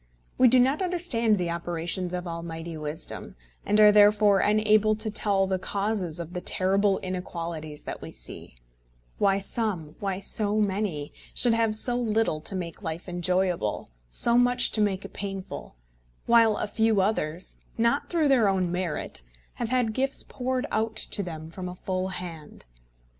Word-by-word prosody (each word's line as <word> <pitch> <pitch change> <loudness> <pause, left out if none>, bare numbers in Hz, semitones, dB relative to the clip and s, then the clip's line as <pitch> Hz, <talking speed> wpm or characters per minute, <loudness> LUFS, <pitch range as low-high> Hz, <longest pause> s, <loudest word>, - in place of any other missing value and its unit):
We 255 - +5
do 250 +1 +5
not 265 +7 +2
understand 330 - +2
the 175 -2 -1
operations 170 +1 -3
of 180 0 -4
Almighty 165 0 -6
wisdom, 150 0 -5 0.3
and 210 - +2
are 210 -1 +8
therefore 205 -1 +5
unable 215 +1 +3
to 215 0 -2
tell 200 -2 +1
the 190 -1 -1
causes 195 -4 -2
of 170 0 -7
the 180 - -4
terrible 195 +2 +2
inequalities 170 -4 -5
that - - -6
we - - -8
see, - - -7 0.6
why 195 -1 +3
some, 195 -6 -2
why 195 -2 -2
so 205 +1 0
many, 195 -8 -1 0.2
should 240 -2 +4
have 225 -1 +1
so 240 +3 +2
little 220 -9 0
to 190 - -2
make 175 +1 -5
life 165 -1 -5
enjoyable, 175 - -1 0.2
so 235 - +5
much 245 0 +3
to 215 - +1
make 195 -2 0
it - - -10
painful, 195 - -6 0.5
while 230 -2 +5
a - - -1
few 220 0 +1
others, 185 -4 -1 0.2
not 235 +5 +1
through 330 -4 +2
their 240 -7 +4
own 185 -2 0
merit, 180 - -1 0.4
have 225 - -1
had 245 -3 +1
gifts 270 +3 0
poured 255 0 -3
out 220 0 -1
to 215 - -1
them 160 -3 -7
from 180 +1 -6
a 180 - -8
full 185 0 -3
hand. 175 -5 -8
195 Hz, 165 wpm, -26 LUFS, 175-220 Hz, 0.6 s, are